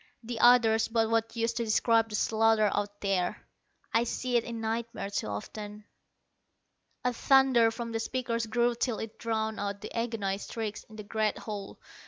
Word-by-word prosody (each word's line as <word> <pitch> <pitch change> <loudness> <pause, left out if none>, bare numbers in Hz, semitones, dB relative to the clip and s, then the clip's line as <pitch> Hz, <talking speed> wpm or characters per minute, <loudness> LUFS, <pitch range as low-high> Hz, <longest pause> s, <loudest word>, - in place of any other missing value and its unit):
The 230 0 -5
others 225 -2 +5
but 225 -1 +1
what 225 0 0
use 230 0 0
to 235 0 -1
describe 225 +1 +3
the 210 - -4
slaughter 220 -1 +3
out 205 0 -3
there! 195 0 -1 0.5
I 230 - +4
see 250 +1 -2
it 235 - +4
in 235 -1 -6
nightmares 225 -2 -3
too - - -2
often. 205 - -7 1.2
A 250 - +2
thunder 265 -2 +5
from 230 +1 -5
the 225 - -2
speakers 230 -1 -2
grew 240 +2 +2
till 235 -1 -1
it 220 -1 -7
drowned 220 -1 -2
out 200 0 -3
the - - -8
agonized 220 -4 -2
shrieks 220 -2 -4
in 220 - -15
the 215 - -7
great 215 0 -1
hall. 205 -3 -7
225 Hz, 175 wpm, -29 LUFS, 210-235 Hz, 1.2 s, others